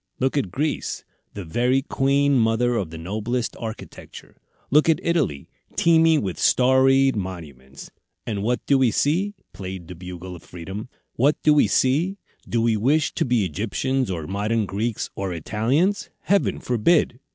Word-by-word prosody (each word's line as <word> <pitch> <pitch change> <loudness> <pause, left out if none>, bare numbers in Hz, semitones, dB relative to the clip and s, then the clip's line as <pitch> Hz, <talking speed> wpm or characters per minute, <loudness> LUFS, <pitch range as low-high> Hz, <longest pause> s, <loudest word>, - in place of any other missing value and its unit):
Look 130 +2 0
at 135 -10 0
Greece; 145 - -2 0.3
the 100 -3 -6
very 125 +10 +1
queen 140 +1 +1
mother 120 0 +2
of 95 -8 -2
the 80 - -8
noblest 110 +8 -3
architecture! 115 -2 -9 0.4
Look 150 +4 +4
at 160 - +3
Italy, 150 - 0 0.3
teeming 165 -3 +4
with 95 -3 -4
'storied 130 +1 +4
monuments,' 75 -9 -8 0.3
and 105 -4 -3
what 120 +4 -1
do 140 -1 +3
we 130 -2 +4
see?" 175 - 0 0.2
played 95 -3 -7
the 90 - -8
Bugle 90 +1 -8
of 85 - -12
Freedom. 95 +8 -8 0.3
"What 140 +5 +3
do 150 - +5
we 150 - +4
see? 160 +10 +1 0.3
Do 115 -1 +1
we 115 -1 +2
wish 145 +9 +1
to - - 0
be 120 -5 +1
Egyptians, 115 - -2
or 85 -4 -3
modern 105 +5 -1
Greeks, 105 +4 -3
or 95 -2 -3
Italians? 125 - 0
Heaven 200 +1 +1
forbid!" 125 +2 +1
120 Hz, 155 wpm, -23 LUFS, 95-140 Hz, 0.4 s, do